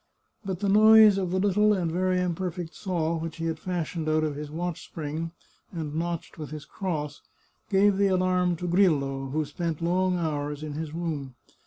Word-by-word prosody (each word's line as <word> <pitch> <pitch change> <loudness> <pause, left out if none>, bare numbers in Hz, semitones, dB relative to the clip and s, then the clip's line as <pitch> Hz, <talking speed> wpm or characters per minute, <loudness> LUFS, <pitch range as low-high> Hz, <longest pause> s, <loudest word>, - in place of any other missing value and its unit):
But 190 -2 -4
the 200 - +1
noise 215 0 +7
of 185 -2 -1
the 185 - 0
little 205 +2 +3
and 175 -5 -1
very 185 +1 +1
imperfect 175 -1 -3
saw 170 -4 -1
which 165 0 -5
he 165 - -3
had 160 -1 -2
fashioned 170 -3 -3
out 155 0 +2
of 150 -2 -1
his 150 0 -6
watch 170 +2 -4
spring 160 +1 -5 0.4
and 160 -4 -5
notched 170 +1 -4
with 150 - -6
his 150 -1 -7
cross 150 -7 -4 0.5
gave 200 0 +4
the 200 0 +3
alarm 185 -1 +2
to 180 +2 -5
Grillo, 145 -7 +2
who 155 +3 -1
spent 160 +2 -3
long 180 +2 +1
hours 150 -3 -2
in 150 -1 -5
his 155 0 -4
room. 155 -6 -4
170 Hz, 185 wpm, -27 LUFS, 155-185 Hz, 0.5 s, noise